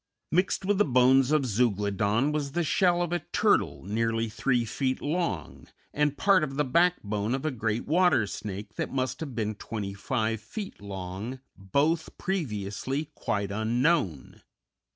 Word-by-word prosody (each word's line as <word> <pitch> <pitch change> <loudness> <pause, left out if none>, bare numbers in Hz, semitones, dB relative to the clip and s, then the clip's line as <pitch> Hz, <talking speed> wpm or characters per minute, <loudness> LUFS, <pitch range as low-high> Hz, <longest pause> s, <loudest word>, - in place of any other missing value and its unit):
Mixed 185 +2 +1
with 205 0 +2
the - - +7
bones 130 0 +4
of 155 -3 +3
Zeuglodon 105 +2 +1
was 145 -2 -2
the 175 - +1
shell 175 +2 +3
of 175 0 -3
a 175 - +1
turtle, - - +1
nearly 115 +3 0
three 120 +2 +1
feet 130 +3 -1
long, 155 - -3 0.3
and 150 -1 +1
part 195 -4 +4
of 135 -3 -3
the 150 +1 +1
backbone 125 - +1
of 135 - -5
a 155 - +1
great 110 -2 -2
water 175 - +3
snake 100 0 -6
that - - -2
must 130 -1 -1
have 140 -6 -6
been 110 -1 -1
twenty 105 -1 -5
five 110 +2 -1
feet 195 - -7
long, 100 +5 -6 0.2
both 150 - 0
previously 135 - -3
quite 100 -6 -2
unknown. 110 - 0
125 Hz, 150 wpm, -28 LUFS, 105-155 Hz, 0.3 s, the